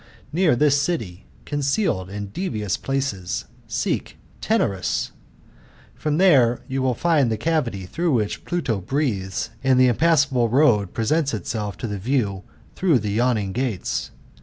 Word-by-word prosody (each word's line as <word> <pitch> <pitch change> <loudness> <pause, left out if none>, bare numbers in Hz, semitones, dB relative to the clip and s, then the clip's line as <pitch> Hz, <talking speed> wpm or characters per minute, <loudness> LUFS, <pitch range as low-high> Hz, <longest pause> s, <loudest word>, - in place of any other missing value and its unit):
Near 170 -5 +3
this 145 +2 +3
city, 110 - -3 0.2
concealed 140 - 0
in 100 0 -5
devious 105 - -2
places, 135 -10 -2 0.2
seekjlenarusi 95 -2 -2 0.8
for 155 - -4
thefe 145 -8 +4
you 135 0 -2
will 130 -2 +1
find 150 -5 +2
the 110 - 0
cavity 115 - -1
through 165 - -1
^i^hich 105 -3 -1
PlutQ 125 - -2
breathes, 115 -7 -1
an, 130 -1 +4
dJ.heimpa«fsaDie 130 -1 +3 0.4
iroadpfesents 135 - 0
itselif 105 0 -2 0.3
through 175 -7 +3
the 105 -3 -2
yawning 110 -3 +1
gates. 115 -3 -2
125 Hz, 110 wpm, -23 LUFS, 105-145 Hz, 0.8 s, thefe